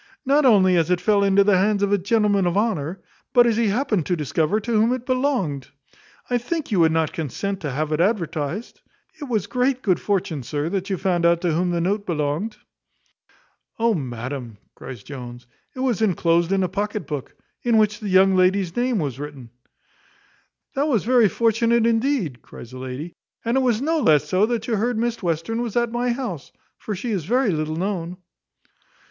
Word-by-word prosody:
Not 280 Hz, +2 st, +3 dB
only 190 Hz, -6 st, +5 dB
as 165 Hz, 0 st, +1 dB
it 180 Hz, -1 st, +2 dB
fell 200 Hz, +2 st, +2 dB
into 200 Hz, 0 st, +4 dB
the 195 Hz, -2 st, +3 dB
hands 205 Hz, +1 st, +1 dB
of 200 Hz, -, +1 dB
a -, -, +4 dB
gentleman 200 Hz, -1 st, +2 dB
of 175 Hz, +2 st, 0 dB
honour, 190 Hz, -5 st, -1 dB, 0.3 s
but 245 Hz, -2 st, +6 dB
as 235 Hz, -2 st, +2 dB
he 230 Hz, 0 st, +1 dB
happened 210 Hz, -, 0 dB
to 180 Hz, -, +1 dB
discover 155 Hz, +5 st, 0 dB
to 235 Hz, +3 st, -5 dB
whom 225 Hz, +2 st, +3 dB
it 250 Hz, -1 st, -5 dB
belonged. 255 Hz, -, -1 dB, 0.6 s
I 245 Hz, -1 st, +1 dB
think 300 Hz, +3 st, -4 dB
you 195 Hz, -, +2 dB
would 160 Hz, -1 st, +5 dB
not 160 Hz, -1 st, 0 dB
consent 190 Hz, +6 st, -3 dB
to 150 Hz, -, -4 dB
have 150 Hz, +3 st, -2 dB
it 155 Hz, -, 0 dB
advertised. 175 Hz, -1 st, -2 dB, 0.4 s
It 295 Hz, -, -5 dB
was 220 Hz, -7 st, -1 dB
great 250 Hz, +4 st, 0 dB
good 185 Hz, -5 st, +2 dB
fortune, 180 Hz, -7 st, -1 dB
sir, 145 Hz, +5 st, -3 dB
that 195 Hz, +1 st, -3 dB
you 190 Hz, -, -1 dB
found 180 Hz, -2 st, 0 dB
out 170 Hz, 0 st, +4 dB
to 175 Hz, -2 st, +1 dB
whom 175 Hz, +3 st, 0 dB
the 175 Hz, -1 st, 0 dB
note 200 Hz, +4 st, -1 dB
belonged." 160 Hz, +6 st, -2 dB, 1.2 s
"Oh, 230 Hz, 0 st, +2 dB
madam," 125 Hz, -, -5 dB, 0.2 s
cries 125 Hz, -6 st, -10 dB
Jones, 125 Hz, -3 st, -9 dB, 0.3 s
"it 255 Hz, -, -5 dB
was 245 Hz, -5 st, 0 dB
enclosed 170 Hz, -4 st, +2 dB
in 195 Hz, -1 st, +2 dB
a -, -, +1 dB
pocket 205 Hz, +3 st, -3 dB
book, 145 Hz, -4 st, -6 dB, 0.3 s
in 235 Hz, -2 st, +2 dB
which 210 Hz, 0 st, +2 dB
the 210 Hz, -3 st, -5 dB
young 190 Hz, +1 st, +5 dB
lady's 185 Hz, -1 st, +2 dB
name 245 Hz, -1 st, +1 dB
was 140 Hz, -7 st, -3 dB
written." 140 Hz, -5 st, -8 dB, 1.2 s
"That 280 Hz, +2 st, 0 dB
was 235 Hz, -, +1 dB
very 240 Hz, -3 st, +4 dB
fortunate, 230 Hz, +1 st, +2 dB
indeed," 225 Hz, -, 0 dB
cries 115 Hz, -, -12 dB
the 130 Hz, -, -9 dB
lady: 130 Hz, +6 st, -6 dB, 0.3 s
"And 230 Hz, +2 st, +1 dB
it -, -, +4 dB
was 245 Hz, -1 st, +1 dB
no 320 Hz, +2 st, +1 dB
less 150 Hz, -, +3 dB
so, 185 Hz, +7 st, +2 dB
that 230 Hz, -2 st, -2 dB
you 225 Hz, -3 st, 0 dB
heard 235 Hz, +3 st, 0 dB
Miss 235 Hz, +1 st, -1 dB
Western 175 Hz, +6 st, -2 dB
was 235 Hz, -4 st, -4 dB
at 235 Hz, -1 st, +1 dB
my 240 Hz, +1 st, 0 dB
house; 235 Hz, -, -5 dB, 0.3 s
for 210 Hz, -, -4 dB
she 225 Hz, +6 st, -4 dB
is 185 Hz, -7 st, -2 dB
very 245 Hz, +2 st, +2 dB
little 155 Hz, -1 st, -2 dB
known." 180 Hz, -1 st, -3 dB
195 Hz, 200 wpm, -22 LUFS, 165-230 Hz, 1.2 s, but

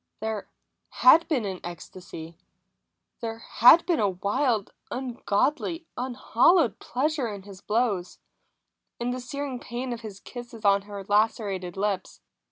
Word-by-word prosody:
There 220 Hz, -1 st, -3 dB, 0.4 s
had 330 Hz, +2 st, +6 dB
been 265 Hz, -9 st, 0 dB
an 190 Hz, -2 st, -4 dB
ecstasy; 170 Hz, -1 st, -9 dB, 0.8 s
there 225 Hz, -1 st, -4 dB
had 245 Hz, +8 st, +6 dB
been 345 Hz, -4 st, +1 dB
a 205 Hz, -, +3 dB
wild, 205 Hz, +4 st, 0 dB, 0.2 s
ungodly, 265 Hz, -, -1 dB
unhallowed 255 Hz, -, +2 dB
pleasure 280 Hz, 0 st, -1 dB
in 200 Hz, -3 st, -6 dB
his 195 Hz, -1 st, -12 dB
blows, 210 Hz, -5 st, 0 dB, 0.8 s
in 240 Hz, +1 st, -1 dB
the 255 Hz, -, -3 dB
searing 265 Hz, +1 st, -4 dB
pain 245 Hz, +1 st, -4 dB
of 235 Hz, -, -7 dB
his 210 Hz, -4 st, -8 dB
kisses 240 Hz, -2 st, -9 dB
on 200 Hz, 0 st, +5 dB
her 200 Hz, -1 st, -6 dB
lacerated 200 Hz, -3 st, 0 dB
lips. 195 Hz, -2 st, -2 dB
225 Hz, 130 wpm, -26 LUFS, 200-255 Hz, 0.8 s, had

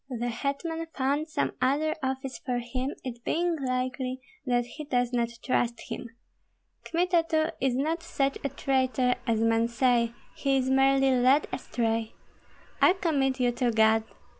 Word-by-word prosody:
The 240 Hz, -1 st, -2 dB
hetman 285 Hz, +7 st, -3 dB
found 285 Hz, +4 st, 0 dB
some -, -, 0 dB
other 295 Hz, +5 st, +2 dB
office 265 Hz, 0 st, -3 dB
for 250 Hz, -2 st, -2 dB
him; 255 Hz, +3 st, -3 dB
it 240 Hz, -2 st, -7 dB
being 345 Hz, +1 st, +1 dB
likely 255 Hz, 0 st, -2 dB, 0.3 s
that 245 Hz, -1 st, +2 dB
he 300 Hz, +5 st, -8 dB
does 245 Hz, -3 st, 0 dB
not 235 Hz, -1 st, +1 dB, 0.2 s
trust 240 Hz, -2 st, +1 dB
him. 240 Hz, -, -5 dB, 0.8 s
Kmita 345 Hz, 0 st, +2 dB
too 315 Hz, 0 st, +2 dB
is 260 Hz, -2 st, +2 dB
not 315 Hz, +6 st, 0 dB
such 275 Hz, -5 st, -1 dB
a 280 Hz, -, 0 dB
traitor 260 Hz, -2 st, +1 dB
as 225 Hz, -2 st, +2 dB
men 225 Hz, 0 st, +3 dB
say; 235 Hz, -1 st, +2 dB, 0.2 s
he 275 Hz, -1 st, +1 dB
is 260 Hz, 0 st, 0 dB
merely 270 Hz, 0 st, +4 dB
led 255 Hz, +3 st, +4 dB
astray. 225 Hz, -3 st, -2 dB, 0.7 s
I -, -, +7 dB
commit 275 Hz, -8 st, 0 dB
you 245 Hz, -1 st, +3 dB
to 240 Hz, 0 st, 0 dB
God. 220 Hz, 0 st, +4 dB
260 Hz, 155 wpm, -28 LUFS, 245-280 Hz, 0.8 s, I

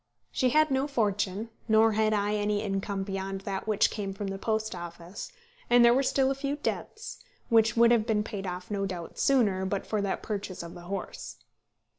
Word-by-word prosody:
She 255 Hz, -, +2 dB
had 310 Hz, +3 st, +3 dB
no 265 Hz, +1 st, +1 dB
fortune, 210 Hz, -4 st, -1 dB, 0.2 s
nor 220 Hz, 0 st, +5 dB
had 215 Hz, 0 st, +2 dB
I 205 Hz, 0 st, +1 dB
any 210 Hz, 0 st, 0 dB
income 195 Hz, -1 st, -2 dB
beyond 195 Hz, 0 st, -4 dB
that 195 Hz, +1 st, -4 dB
which 215 Hz, -2 st, +3 dB
came 195 Hz, -2 st, -4 dB
from 200 Hz, -1 st, -4 dB
the 195 Hz, 0 st, -5 dB
Post 220 Hz, +1 st, -1 dB
Office; 175 Hz, +1 st, -8 dB, 0.4 s
and 240 Hz, 0 st, +7 dB
there 235 Hz, -, +7 dB
were 265 Hz, -, +3 dB
still 270 Hz, 0 st, +2 dB
a -, -, +2 dB
few 275 Hz, +1 st, -2 dB
debts, 435 Hz, +9 st, -4 dB, 0.3 s
which 225 Hz, -1 st, +4 dB
would 235 Hz, 0 st, +6 dB
have 230 Hz, -2 st, +3 dB
been 210 Hz, -2 st, +2 dB
paid 200 Hz, -3 st, -5 dB
off 180 Hz, +2 st, -6 dB
no 195 Hz, -1 st, -1 dB
doubt 175 Hz, -3 st, -7 dB
sooner, 210 Hz, -9 st, +3 dB
but 190 Hz, +1 st, -2 dB
for 215 Hz, -2 st, -1 dB
that 200 Hz, -1 st, -2 dB
purchase 200 Hz, -4 st, -4 dB
of 170 Hz, -, -8 dB
the 175 Hz, -, -11 dB
horse. 180 Hz, -, -5 dB
210 Hz, 200 wpm, -28 LUFS, 195-230 Hz, 0.4 s, and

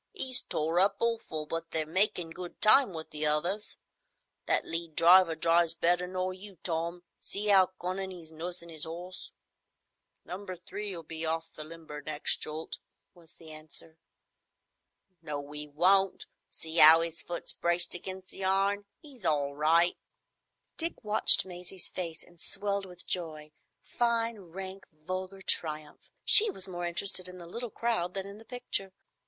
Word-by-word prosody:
"'E's 260 Hz, -8 st, +2 dB
tore 160 Hz, +3 st, -1 dB
up 195 Hz, +2 st, +4 dB
awful, 225 Hz, -10 st, -2 dB
but 165 Hz, +2 st, -4 dB
they're 160 Hz, -1 st, -1 dB
makin' 175 Hz, 0 st, +2 dB
good 175 Hz, +1 st, -9 dB
time 225 Hz, +2 st, +6 dB
with 160 Hz, -2 st, -7 dB
the 150 Hz, 0 st, -3 dB
others. 170 Hz, +8 st, +1 dB, 0.7 s
That -, -, +1 dB
lead 165 Hz, -1 st, -4 dB
driver 175 Hz, 0 st, +6 dB
drives 165 Hz, 0 st, +3 dB
better 175 Hz, +2 st, +2 dB
nor 185 Hz, 0 st, -2 dB
you, 190 Hz, 0 st, -11 dB
Tom. 170 Hz, +1 st, -3 dB, 0.2 s
See 205 Hz, +1 st, 0 dB
'ow 190 Hz, -2 st, +6 dB
cunnin' 190 Hz, +2 st, -3 dB
'e's 170 Hz, -3 st, -10 dB
nursin' 170 Hz, +1 st, -7 dB
'is 160 Hz, -1 st, -3 dB
'orse." 175 Hz, +3 st, -7 dB, 0.9 s
"Number 185 Hz, +1 st, -6 dB
Three'll 185 Hz, 0 st, -5 dB
be 160 Hz, +1 st, -5 dB
off 165 Hz, 0 st, -2 dB
the 155 Hz, -, -6 dB
limber, 155 Hz, -2 st, -9 dB
next 155 Hz, 0 st, 0 dB
jolt," 155 Hz, +1 st, -6 dB, 0.3 s
was 170 Hz, -2 st, -17 dB
the 160 Hz, -1 st, -10 dB
answer. 155 Hz, +1 st, -10 dB, 1.2 s
"No, 145 Hz, -2 st, -6 dB
'e 150 Hz, 0 st, -4 dB
won't. 190 Hz, +6 st, +3 dB, 0.2 s
See 160 Hz, +1 st, -3 dB
'ow 160 Hz, +2 st, +10 dB
'is 165 Hz, -1 st, -2 dB
foot's 175 Hz, -, -3 dB
braced 170 Hz, 0 st, +1 dB
against 185 Hz, +1 st, -5 dB
the 195 Hz, -, -6 dB
iron? 195 Hz, +2 st, +1 dB, 0.2 s
'E's 270 Hz, -8 st, -9 dB
all 145 Hz, -4 st, +1 dB
right." 165 Hz, +4 st, +3 dB, 0.8 s
Dick 335 Hz, -4 st, -4 dB
watched 210 Hz, -2 st, +5 dB
Maisie's 180 Hz, 0 st, -4 dB
face 170 Hz, -3 st, -5 dB
and 175 Hz, -1 st, -17 dB
swelled 200 Hz, -1 st, -2 dB
with 180 Hz, -1 st, -10 dB
joy—fine, 195 Hz, +8 st, -2 dB
rank, 190 Hz, +2 st, -9 dB
vulgar 185 Hz, +5 st, -6 dB
triumph. 155 Hz, -4 st, -2 dB, 0.2 s
She 440 Hz, +1 st, +9 dB
was 195 Hz, -, -5 dB
more 175 Hz, -1 st, -4 dB
interested 185 Hz, +1 st, +1 dB
in 180 Hz, 0 st, -10 dB
the 175 Hz, -, -10 dB
little 235 Hz, +8 st, -5 dB
crowd 210 Hz, -6 st, -1 dB
than 195 Hz, -1 st, -3 dB
in 200 Hz, +1 st, -10 dB
the 225 Hz, -, -15 dB
picture. 225 Hz, -6 st, -4 dB
175 Hz, 155 wpm, -30 LUFS, 160-195 Hz, 1.2 s, ow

